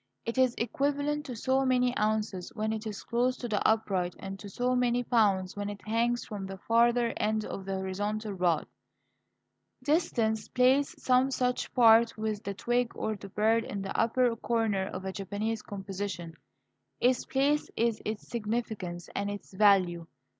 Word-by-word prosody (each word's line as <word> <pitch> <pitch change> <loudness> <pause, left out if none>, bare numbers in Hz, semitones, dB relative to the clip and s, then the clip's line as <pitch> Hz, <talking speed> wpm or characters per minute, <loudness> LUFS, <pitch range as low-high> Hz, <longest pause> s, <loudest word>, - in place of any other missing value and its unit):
It 230 +3 -2
is 255 -2 +3
equivalent 285 +4 -1
to 250 - -5
so 260 +4 +1
many 250 -1 +2
ounces 210 -3 -1
when 220 0 -1
it 220 0 -4
is 210 -2 -6
close 250 +2 0
to 245 - -5
the 210 -3 0
upright, 195 -5 +1
and 195 0 -7
to 200 - -8
so 250 +5 0
many 245 0 +2
pounds 200 -6 +2
when 205 0 -3
it 205 +1 -9
hangs 235 +2 +1
from 200 -3 -6
the 195 0 -7
farther 235 +3 +3
end 215 0 0
of 190 - -6
the 195 0 -2
horizontal 205 +3 -3
rod. 175 -3 +1 1.2
Distance 235 -8 +1
plays 260 +3 +3
some 255 +1 +3
such 250 -2 -1
part 230 -2 +6
with 215 -1 -2
the 200 0 -4
twig 240 +3 0
or 220 - -2
the 200 0 -10
bird 220 +3 +2
in 200 -2 -5
the 195 - -5
upper 235 +1 +2
corner 225 -5 0
of 185 0 -6
a 190 - -3
Japanese 210 +3 -3
composition. 195 -4 -5 0.7
Its 250 0 +3
place 285 +3 +1
is 230 -1 +1
its 215 0 -4
significance 210 -6 -3
and 200 0 -2
its 205 -1 -7
value. 185 -4 +3
220 Hz, 170 wpm, -29 LUFS, 200-245 Hz, 1.2 s, part